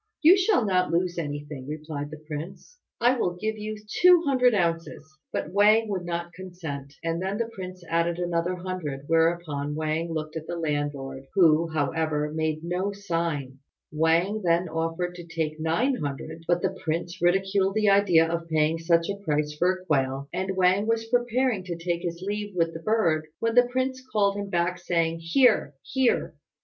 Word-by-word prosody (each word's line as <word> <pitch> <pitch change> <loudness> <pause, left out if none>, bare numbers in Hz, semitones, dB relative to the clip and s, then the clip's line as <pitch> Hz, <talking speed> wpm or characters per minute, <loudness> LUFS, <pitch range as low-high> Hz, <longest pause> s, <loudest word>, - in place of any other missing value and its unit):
"You 335 +5 +9
shall 380 - +2
not 185 -2 +2
lose 175 +1 0
anything," 145 -3 -5
replied 150 -1 -5
the 155 - -8
prince; 170 - -8 0.2
"I 245 +2 +4
will 175 -5 0
give 220 +4 -2
you 215 0 -4 0.2
two 360 -1 +7
hundred 250 -4 +3
ounces." 165 -4 -1 0.3
But 155 - -3
Wang 215 +2 +5
would 185 -3 -2
not 170 0 -4
consent, 165 -6 -7
and 165 +1 -1
then 190 +2 -2
the 230 - 0
prince 185 -2 -8
added 170 +1 0
another 175 0 -1
hundred; 175 -7 -5
whereupon 165 -3 +1
Wang 155 +2 -2
looked 155 0 -4
at 160 -1 -6
the 175 - -3
landlord, 145 -4 -3
who, 165 -3 +5
however, 150 0 -1
made 155 0 -1
no 180 +4 -1
sign. 165 -9 -3 0.3
Wang 165 +7 +2
then 170 +1 +2
offered 165 +2 -2
to 175 -1 -9
take 160 -2 -3
nine 165 - +1
hundred; 145 +3 -5
but 175 0 +1
the 190 0 0
prince 170 +2 -3
ridiculed 195 +2 +2
the 215 -1 +3
idea 180 -5 +5
of 170 0 -3
paying 155 +1 +2
such 165 0 +2
a 200 0 -5
price 150 -3 0
for 180 +4 +3
a 185 0 -7
quail, 135 -3 0
and 190 0 -2
Wang 190 +3 +3
was 225 0 +1
preparing 245 -3 +1
to 175 -2 -4
take 170 0 -2
his 170 +1 -4
leave 205 -1 -3
with 165 -1 +1
the 165 - -6
bird, 165 -7 +1
when 230 0 0
the 245 0 +5
prince 260 +1 -2
called 200 -2 +2
him 200 -1 -4
back, 175 0 0
saying, 165 -2 0
"Here! 165 - +3
here! 265 -2 +1
170 Hz, 180 wpm, -26 LUFS, 160-200 Hz, 0.3 s, You